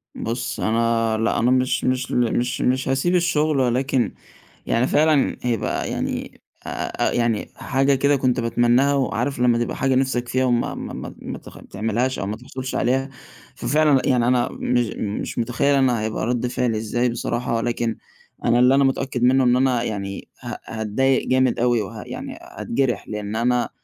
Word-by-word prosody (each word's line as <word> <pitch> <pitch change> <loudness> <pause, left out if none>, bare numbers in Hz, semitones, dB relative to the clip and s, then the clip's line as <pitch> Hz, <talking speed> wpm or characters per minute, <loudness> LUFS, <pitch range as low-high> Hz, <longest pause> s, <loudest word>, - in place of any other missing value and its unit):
بص، 120 +2 -3
أنا 115 0 +1
لا، 115 +1 +1
أنا 120 +2 +3
مش 130 0 +1
مش 130 0 0
ل 120 -2 +1
مش 125 +1 -1
مش 130 +1 +1
هاسيب 135 +7 +1
الشغل، 155 -4 +2
ولكن 130 -2 +1 0.5
يعني 120 +3 +1
فعلًا 150 -1 +3
هيبقى 120 -4 -1
يعني - - -4 0.2
آآ، - - -5 0.4
آآ، - - -3
يعني 115 -3 0
حاجة 135 +1 +1
كده 140 +2 +3
كنت 130 -2 +1
باتمناها، 120 +4 +3
وعارف 135 -1 -1
لمّا 120 -1 +3
تبقى 120 0 -2
حاجة 135 -1 +1
نفسك 130 -2 0
فيها 130 +2 +1
وما 120 -1 0
ما - - -6
ما - - -7
ما - - -6
ت - - -13 0.2
تعملهاش 115 +5 -1
أو - - -2
ما 105 +2 -4
تحصلش 130 +2 -6
عليها؟ 135 +2 +1 0.5
ففعلًا 150 -3 +3
يعني 125 -2 +3
أنا 125 -1 +2
مش 120 -1 0
مش 105 -1 -4
متخيّل 125 +5 +1
أنا 130 -4 +2
هيبقى 110 0 -2
رد 125 +1 0
فعلي 125 -2 0
إزاي 120 +3 0
بصراحة. 120 0 -2
ولكن 115 0 -1 0.5
أنا 120 +1 +4
اللي 125 +2 +5
أنا 140 - +4
متأكّد 135 -2 0
منّه 130 +2 +4
إن 125 -1 +4
أنا 125 -2 +2
يعني 100 -3 -4 0.2
ه - - -5
هاتضايق 110 +5 0
جامد 130 -1 +2
أوي، 120 -1 +2
وه 95 - -7
يعني - - -7
هاتجرح، 120 -4 -2
لأن 105 0 -4
أنا 120 +1 +1
125 Hz, 175 wpm, -22 LUFS, 115-130 Hz, 0.5 s, اللي